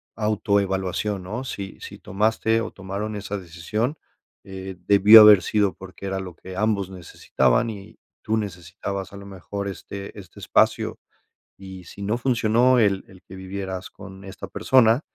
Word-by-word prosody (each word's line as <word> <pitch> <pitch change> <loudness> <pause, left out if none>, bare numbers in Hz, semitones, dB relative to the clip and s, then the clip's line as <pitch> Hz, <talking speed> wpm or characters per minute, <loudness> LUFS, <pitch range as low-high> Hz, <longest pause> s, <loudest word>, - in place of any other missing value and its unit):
autoevaluación, 100 -2 -1
¿no? 110 +8 -5
Si 100 -6 -7
si - - -9
tomaste 110 +2 0
o 115 - -5
tomaron 100 +2 -5
esa 105 0 -4
decisión, 100 - -3 0.5
eh, 95 -1 -8
debió 105 +2 +9
haber 105 -3 +9
sido 100 -3 +1
porque 95 +1 -11
era 95 0 -2
lo 90 -3 -8
que 95 +1 -10
ambos 100 -2 0
necesitaban 85 - 0
y 100 0 -11 0.3
tú 110 +1 0
necesitabas, 95 0 -5
a - - -8
lo 100 - -11
mejor, 100 +1 -6
este 100 +1 -8
este 95 -4 -13
espacio, - - +1 0.6
y 95 -2 -11
si 100 - -12
no 105 +4 -1
funcionó 120 0 +3
el 100 -4 +2
el 95 -1 -17
que 95 - -12
vivieras 95 0 -6
con 95 0 -12
esta 95 - -8
persona, 125 -1 +3
100 Hz, 155 wpm, -23 LUFS, 95-110 Hz, 0.6 s, debió